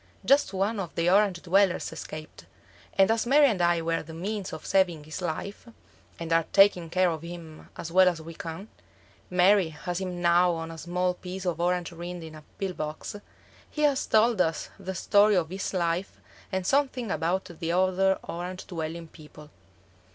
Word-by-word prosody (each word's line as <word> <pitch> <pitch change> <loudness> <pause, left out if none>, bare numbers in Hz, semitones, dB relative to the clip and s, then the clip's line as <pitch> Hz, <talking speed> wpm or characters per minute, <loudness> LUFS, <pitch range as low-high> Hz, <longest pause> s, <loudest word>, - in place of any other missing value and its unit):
Just 280 +2 +4
one 200 +3 -1
of 175 -4 -5
the 170 +1 +2
Orange 195 -3 +3
dwellers 190 +1 +2
escaped, 155 0 -9 0.5
and 195 +2 +5
as 225 +1 0
Mary 290 +3 +6
and 215 -9 +1
I 170 -1 +2
were 165 0 0
the 160 0 -10
means 195 +3 -4
of - - -8
saving 175 -5 +2
his 155 +4 -7
life, 180 +6 -5 0.5
and 165 -1 -3
are 165 -1 +3
taking 195 -4 +5
care 185 +1 +2
of 160 -2 -5
him 170 -2 -10
as 165 - -6
well 185 +1 +6
as 170 -2 -4
we 165 +1 -9
can 165 +5 -7 0.6
(Mary 180 0 +4
has 175 +4 -5
him 180 -2 -4
now 175 +1 +4
on 165 0 -5
a 165 - -9
small 180 +2 -1
piece 185 +1 -7
of 170 -2 -1
orange 180 0 0
rind 175 0 -7
in 160 -1 -9
a 155 - -11 0.2
pill 195 -2 -3
box), 155 +4 -5 0.5
he 300 - -3
has 285 -2 +2
told 220 -2 +4
us 165 -3 -1
the 190 -1 -5
story 205 +3 +4
of 170 -2 0
his 195 +1 -3
life 175 0 -2 0.3
and 190 -1 -2
something 260 -3 +1
about 175 +3 0
the 170 -1 -5
other 185 +1 +2
orange 180 +2 -6
dwelling 165 -1 -5
people. 150 -1 -15
180 Hz, 185 wpm, -27 LUFS, 165-195 Hz, 0.6 s, Mary